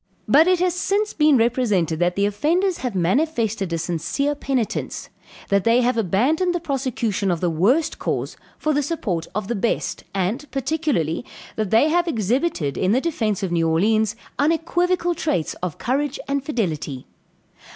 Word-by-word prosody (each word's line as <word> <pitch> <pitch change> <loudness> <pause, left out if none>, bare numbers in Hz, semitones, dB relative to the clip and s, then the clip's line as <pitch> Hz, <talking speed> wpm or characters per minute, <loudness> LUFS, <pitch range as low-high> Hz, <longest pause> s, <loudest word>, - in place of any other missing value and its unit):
"But 310 +4 +6
it 365 0 +4
has 365 -1 +2
since 405 +4 0
been 300 -3 +4
represented 220 - +1
that 175 0 +1
the 200 - +2
offenders 335 - +1
have 245 -5 -3
manifested 220 - 0
a 165 - 0
sincere 170 - -1
penitence; 265 -5 -3 0.4
that 200 -1 +2
they 230 +2 +4
have 250 +1 +2
abandoned 255 - +1
the - - 0
prosecution 250 - -1
of 175 -2 0
the 175 -1 0
worst 235 - +2
cause - - -2 0.2
for 310 - 0
the 290 - +2
support 215 - -2
of 210 -2 -2
the 240 - -1
best, 225 +1 -1
and, 205 +10 -2
particularly, 270 - -1 0.3
that 215 -3 -2
they 225 +9 +4
have 345 +2 +2
exhibited, 225 - 0
in 190 +2 +2
the 255 - +3
defence 225 - -1
of 185 - -2
New 165 -1 +2
Orleans, 215 +6 +2 0.2
unequivocal 345 +3 +1
traits 235 - -1
of 180 -4 -3
courage 280 +3 -1
and 280 -1 -1
fidelity. 165 - -3
235 Hz, 160 wpm, -22 LUFS, 190-305 Hz, 0.4 s, But